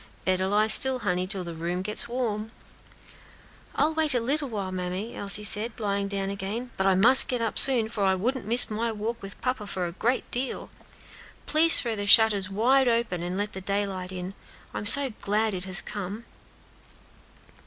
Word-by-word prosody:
"Better 185 0 -1
lie 210 +2 0
still, 255 +4 +6
honey, 185 -6 -4
till 195 -1 -5
de 170 -1 -9
room 175 +2 -5
gets 210 +2 +1
warm." 225 -3 -5 1.3
"I'll 310 +2 -1
wait 310 -4 +2
a - - +1
little 280 +4 -3
while, 200 -4 -6
mammy," 185 +4 -6
Elsie 200 +1 +1
said, 220 +3 +2
lying 200 -2 -3
down 195 -1 -5
again, 205 +6 -7
"but 190 - -2
I 190 - +2
must 240 +8 +5
get 250 - -3
up 225 -2 -1
soon; 245 -5 +6
for 220 -2 -5
I 190 -1 +1
wouldn't 235 +4 -4
miss 235 0 +7
my 225 +2 -3
walk 225 +2 -7
with 195 0 -12
papa 250 -4 -4
for 185 -2 -5
a 170 - -6
great 235 +8 -4
deal. 250 +1 -3 0.7
Please 325 +2 +5
throw 230 -3 -3
the 205 -1 -6
shutters 205 -3 +5
wide 250 +6 0
open, 230 -7 -2
and 175 +2 -6
let 205 +1 -5
the 190 - -8
daylight 195 -2 -4
in. 185 +1 -8 0.4
I'm 205 - -3
so 275 +3 +6
glad 215 +1 -2
it 185 0 -5
has 190 0 0
come." 205 +2 -8
210 Hz, 185 wpm, -24 LUFS, 190-235 Hz, 1.3 s, miss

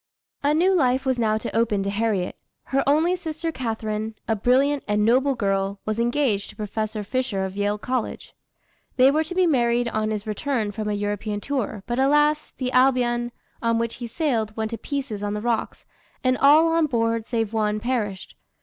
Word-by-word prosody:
A 290 +1 +2
new 365 +4 +4
life 265 -6 +2
was 260 -2 +1
now 215 -2 +2
to 220 - -5
open 220 -3 +1
to 200 - -2
Harriet. 205 -3 -1 0.3
Her 275 0 0
only 320 +5 +3
sister 325 -2 -4
Catharine, 220 -4 -3
a 225 - +2
brilliant 265 +6 +2
and 210 0 +2
noble 260 +4 +3
girl, 195 -2 -1
was 215 +1 -2
engaged 240 -4 +1
to - - -12
Professor 215 0 -3
Fisher 210 -4 -1
of 190 0 -6
Yale 205 +1 0
College. 250 +2 -3 0.6
They 260 +1 +6
were 310 +2 +2
to 355 +3 -7
be 370 0 +4
married 240 -5 +2
on 215 -1 -1
his 210 -1 -3
return 220 0 -1
from 215 0 -4
a - - 0
European 205 +1 -2
tour, 220 -5 -3
but 240 +1 -2
alas! 295 +2 +3
the 255 -1 -2
Albion, 245 -2 +2 0.3
on 230 -1 +1
which 230 0 -2
he 240 - -5
sailed, 230 -6 -1
went 220 0 -2
to 230 - -4
pieces 270 -8 -4
on 205 0 -2
the - - -2
rocks, 235 -1 -2 0.4
and 255 0 +3
all 300 +5 +6
on 325 -1 +2
board, 230 -3 0
save 225 -2 -1
one, 215 -1 0
perished. 210 -5 -3
235 Hz, 190 wpm, -24 LUFS, 215-270 Hz, 0.6 s, They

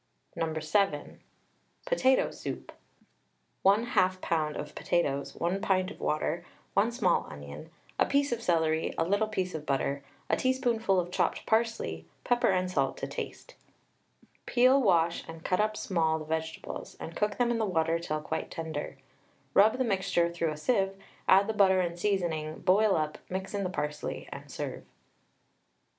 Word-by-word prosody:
No. 160 -1 -1
7. 155 -1 0 0.7
POTATO 265 - +3
SOUP. - - -6 0.9
1/2 200 +4 +5 0.3
lb. 155 -4 -1
of - - -6
potatoes, 140 -5 -1
1 180 +4 -1
pint 190 -2 +1
of - - -11
water, 155 - -1 0.3
1 - - +3
small - - +1
onion, 70 0 -9 0.3
a - - +4
piece 280 0 +2
of 235 -1 -1
celery, 160 -5 +1
a - - +2
little 200 +5 +1
piece 190 -4 -2
of 155 -2 -4
butter, 140 0 0 0.3
a - - +3
teaspoonful 235 -6 +1
of 175 0 -3
chopped - - 0
parsley, 220 - 0 0.2
pepper 240 0 +2
and 185 -1 +1
salt 135 -6 0
to - - -3
taste. - - -7 0.9
Peel, 255 +3 +5
wash, 170 -6 +3
and 165 0 -9
cut 180 - +1
up 215 0 +1
small 160 -4 +1
the 155 - -7
vegetables, 160 +1 -4
and 165 - -7
cook 210 -1 0
them 240 -1 +2
in 235 - 0
the 220 - +2
water 165 -3 +1
till 155 -2 -3
quite 160 +1 -3
tender. 160 -4 -5 0.6
Rub 215 +4 +5
the 260 - +2
mixture 190 -6 +1
through 170 -1 -1
a 155 - -4
sieve, 195 +2 +1 0.3
add 195 +1 +6
the 220 - -1
butter 190 -3 +5
and 175 -1 -1
seasoning, 170 -6 -1
boil 205 +2 +4
up, 155 -1 -1
mix 190 +2 -4
in 200 -1 -1
the 185 - -1
parsley, 150 -4 -4
and - - -10
serve. - - -5
180 Hz, 160 wpm, -29 LUFS, 160-210 Hz, 0.9 s, add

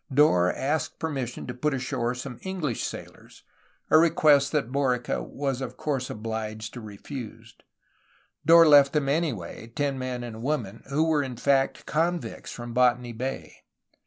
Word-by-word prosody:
Dorr 110 -11 +4
asked 150 +4 -2
permission 135 -7 -4
to 125 - -5
put 135 +4 -1
ashore 130 -2 -2
some 125 0 -7
EngUsh 180 -10 -3
sailors, - - -8 0.5
a 155 - +8
request 150 -4 +4
that 140 -6 -1
Borica 130 -3 0
was 135 -2 -3
of - - -6
course 135 -4 -2
obliged 110 0 -5
to 120 - -7
refuse. 110 +3 -9 0.9
Dorr 165 +1 +7
left 145 -2 +7
them, 150 -3 +1
anyway, 135 - -2
ten 135 +3 -2
men 125 -1 -4
and 115 -2 -7
a - - -9
woman, 115 -5 -3
who 145 +3 +2
were 160 -2 +2
in 130 -4 -5
fact 135 +1 +1
convicts 170 +3 -2
from 120 -1 -7
Botany 125 -1 +2
Bay. 130 +4 -5
135 Hz, 155 wpm, -26 LUFS, 120-150 Hz, 0.9 s, a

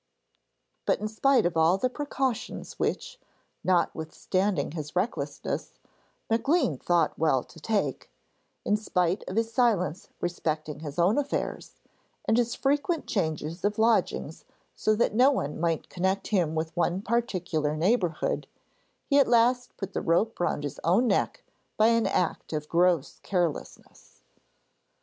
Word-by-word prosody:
But - - +2
in 215 - -2
spite 240 +2 +3
of 175 -1 0
all 165 +3 +4
the 255 - +1
precautions 265 -2 -3
which, - - -2 0.4
notwithstanding 175 0 0
his 155 -1 -6
recklessness, 165 -8 -3 0.5
Maclean 235 - +1
thought 170 -3 +1
well 150 -5 +2
to 165 - -16
take 210 +4 -1 0.6
in 210 - +3
spite 180 -3 0
of 185 - -5
his 225 0 0
silence 195 - +1
respecting 155 -4 -3
his 150 -1 -7
own 185 +9 +3
affairs, 285 -1 -3 0.5
and 220 - +3
his 235 0 +1
frequent 290 +4 0
changes 160 -2 -2
of 205 +1 0
lodgings 225 +1 +1 0.3
so 215 - +1
that 215 - +1
no 250 +5 +6
one 150 - -2
might 165 -1 0
connect 190 +2 -1
him 175 -7 +1
with 160 0 -3
one 175 +2 0
particular 180 -10 -1
neighbourhood, 175 -2 0 0.6
he 285 -1 +4
at 275 - +5
last 245 +1 +2
put 195 - -6
the - - -1
rope 205 +7 +1
round 175 -4 0
his 145 -1 -5
own 190 +9 +3
neck - - 0 0.3
by 220 +1 +5
an 230 -3 +3
act 180 -3 -1
of 150 -1 -3
gross 170 -3 +2
carelessness. 175 -6 -4
185 Hz, 140 wpm, -27 LUFS, 165-230 Hz, 0.6 s, no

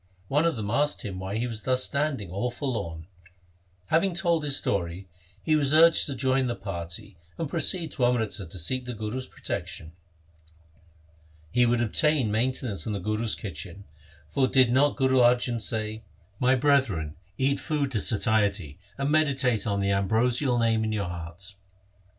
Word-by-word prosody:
One 150 +4 +2
of 170 - +1
them 105 -2 -4
asked 145 +4 +1
him 95 -3 -5
why 95 +3 -4
he 120 - -1
was 115 -3 -5
thus 130 +2 +3
stand 140 -3 0
ing 95 -4 -8
all 100 +7 -2
forlorn. 105 - -4 0.8
Having 170 +3 +2
told 170 -2 +2
his 145 -2 +3
story, 90 0 -2 0.4
he 155 - +2
was 145 -1 +3
urged 165 +1 +6
to 140 - -3
join 130 +1 +1
the 120 - -2
party 90 -2 -6 0.2
and 165 - -2
proceed 170 +2 +2
to 125 - 0
Amritsar 110 -5 -1
to 90 - -7
seek 125 +10 -1
the 125 -1 -5
Guru's 110 +4 -4
protection. 80 - -6 1.6
He 125 +5 +3
would 120 0 +2
obtain 130 +1 +1
mainten 125 +4 0
ance 100 - -5
from 110 - -4
the 100 - -3
Guru's 110 +4 -1
kitchen, 90 0 -8 0.4
for 130 - +1
did 130 -2 +4
not 140 +3 +3
Guru 130 -1 +2
Arjan 120 -1 +3
say: 110 +1 -2 0.2
— 85 - -32
My 130 +1 +3
brethren, 125 - +1 0.2
eat 135 +1 +1
food 145 -4 -2
to 110 -5 -1
satiety, 100 -8 +1 0.2
And 140 +1 -1
meditate 135 -7 +2
on 100 -1 0
the 100 0 +1
ambrosial 120 +6 +1
Name 115 -1 +2
in 110 - -1
your 105 -2 -1
hearts. 85 +3 -6
120 Hz, 175 wpm, -26 LUFS, 100-135 Hz, 1.6 s, urged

